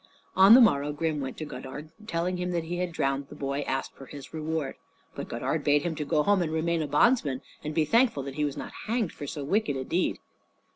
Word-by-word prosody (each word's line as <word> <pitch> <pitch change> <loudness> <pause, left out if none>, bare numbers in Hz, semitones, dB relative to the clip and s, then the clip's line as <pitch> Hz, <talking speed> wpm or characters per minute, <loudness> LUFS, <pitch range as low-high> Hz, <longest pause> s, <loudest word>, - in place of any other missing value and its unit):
On 195 +4 +9
the 255 - +8
morrow 145 -10 +4
Grim 150 0 -1
went 130 -1 -5
to 155 - -4
Godard, 135 +3 -8
and 215 0 -13
telling 175 +2 -1
him 180 0 -2
he 170 +2 -4
had 180 -1 -2
drowned 135 -3 -1
the 150 - -11
boy, 140 -1 -2
asked 135 0 -2
for 135 - -12
his 140 +2 -10
reward. 155 -2 -3 0.4
But - - -6
Godard - - -2
bade 145 0 +3
him 175 - -1
go 150 0 0
home 200 0 +3
and 160 -2 -1
remain 165 +1 0
a 155 - -2
bondsman, 145 - +2 0.2
and 150 0 -4
be 160 - +3
thankful 230 - +3
that 135 0 -6
he 150 - -1
was 145 -2 -2
not - - -6 0.2
hanged 225 -5 0
for 145 - -8
so 145 +1 -5
wicked 200 +1 0
a 130 - -3
deed. 175 +7 0
155 Hz, 235 wpm, -28 LUFS, 140-180 Hz, 0.4 s, On